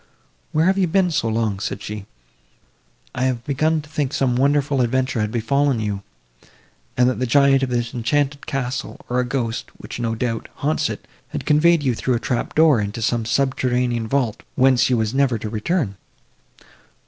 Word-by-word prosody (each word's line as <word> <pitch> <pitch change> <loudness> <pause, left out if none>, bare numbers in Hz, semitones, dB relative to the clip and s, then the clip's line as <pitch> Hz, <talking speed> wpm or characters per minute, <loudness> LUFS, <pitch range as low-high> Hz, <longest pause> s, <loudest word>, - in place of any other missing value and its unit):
"Where 155 +2 +2
have 190 +2 +3
you 185 - +3
been 180 +1 +2
so 125 -7 0
long?" 110 -3 0
said - - -4
she, 105 -1 -6 1.1
"I 130 - -1
had 125 -2 -1
begun 155 +3 +1
to - - -14
think 145 -3 -2
some 130 -3 +1
wonderful 140 +1 +2
adventure 130 -1 0
had 105 0 -1
befallen 130 +3 +1
you, 105 -2 -2 1.0
and 125 0 +4
that 125 - 0
the 130 - 0
giant 140 +2 +4
of 135 - 0
this 120 -1 -1
enchanted 140 +4 -1
castle, 135 -1 -3
or 125 - 0
the 125 - +2
ghost, 120 -3 -2
which, - - -8
no 115 -1 -1
doubt, 115 -1 -3
haunts 150 +2 0
it, - - -7 0.2
had - - -6
conveyed 155 +1 +4
you 130 -3 +2
through 125 +2 0
a - - -1
trap 125 -1 -2
door 155 -7 +5
into 100 +2 -4
some 120 -1 0
subterranean 125 -2 0
vault, 125 -4 0
whence 130 -2 +4
you 125 - +2
were 110 - +1
never 135 -3 +2
to 105 0 -6
return." 115 - -1
130 Hz, 185 wpm, -21 LUFS, 115-140 Hz, 1.1 s, door